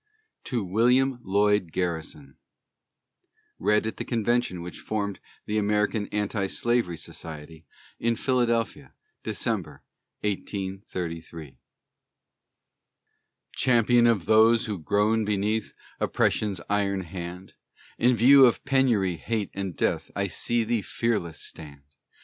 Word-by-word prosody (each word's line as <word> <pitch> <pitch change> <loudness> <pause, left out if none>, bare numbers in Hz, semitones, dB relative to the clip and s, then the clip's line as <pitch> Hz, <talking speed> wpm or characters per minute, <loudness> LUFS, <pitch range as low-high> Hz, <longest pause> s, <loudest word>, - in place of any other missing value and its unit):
TO 120 -5 -2
WILLIAM 125 +7 +2
LLOYD 100 -3 +2
GARRISON 80 -6 -4 1.2
[Read 105 +1 +2
at 110 - -4
the - - -3
Convention 120 -6 0
which 90 - -8
formed 100 -2 -3 0.3
the 105 +1 0
American 105 0 0
Anti 105 -1 -1
Slavery 120 -5 0
Society, 80 -1 -9 0.3
in 115 0 +1
Philadelphia, 120 -2 0 0.3
December, - - -3 0.4
1833.] 90 -6 -5 2.0
Champion 120 -1 +4
of 105 -8 +2
those 110 +2 +5
who 105 -5 -4
groan 105 +7 +1
beneath 105 +1 -1 0.2
Oppression's 100 -4 +1
iron 100 -1 0
hand: 90 +1 -8 0.5
In 125 +1 +4
view 130 +4 +8
of 120 - -1
penury, 120 - +2
hate, 110 +3 -3
and 95 -3 -4
death, - - -1
I - - 0
see 120 -1 -1
thee 115 0 0
fearless 95 -8 -2
stand. 70 -3 -9
105 Hz, 110 wpm, -26 LUFS, 90-115 Hz, 2.0 s, view